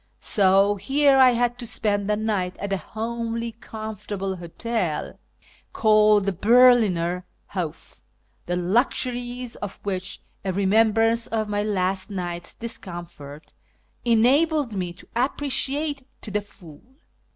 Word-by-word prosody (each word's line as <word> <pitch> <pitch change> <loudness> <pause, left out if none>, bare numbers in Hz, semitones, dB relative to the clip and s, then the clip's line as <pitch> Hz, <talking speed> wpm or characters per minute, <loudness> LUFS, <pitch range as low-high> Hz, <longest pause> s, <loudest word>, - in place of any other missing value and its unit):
So 200 0 +3
here 275 +7 +3
I 260 -1 +8
had 245 +1 0
to 240 - -6
spend 205 -3 0
the 210 - +2
night 205 -4 -1
at 200 -1 -3
a - - +1
homely 230 +2 -4
comfortable 210 -4 -6
hotel, 175 0 -3 0.5
called 215 -2 +4
the 200 - +1
Berliner 200 -5 +4 0.3
Hof, 175 -6 -6 0.5
the 175 - 0
luxuries 245 +5 -1
of 205 -2 -7
which 190 -1 -4 0.2
a 195 - -1
remembrance 225 +4 +3
of 220 -1 -1
my 205 0 0
last 190 -2 -1
night's 175 -3 -5
discomfort 170 -9 -8 0.5
enabled 260 +4 +3
me 180 -3 -3
to 175 - -16
appreciate 280 +2 -1
to 215 - -7
the 210 +1 0
full. 170 -7 -15
210 Hz, 120 wpm, -24 LUFS, 190-235 Hz, 0.5 s, I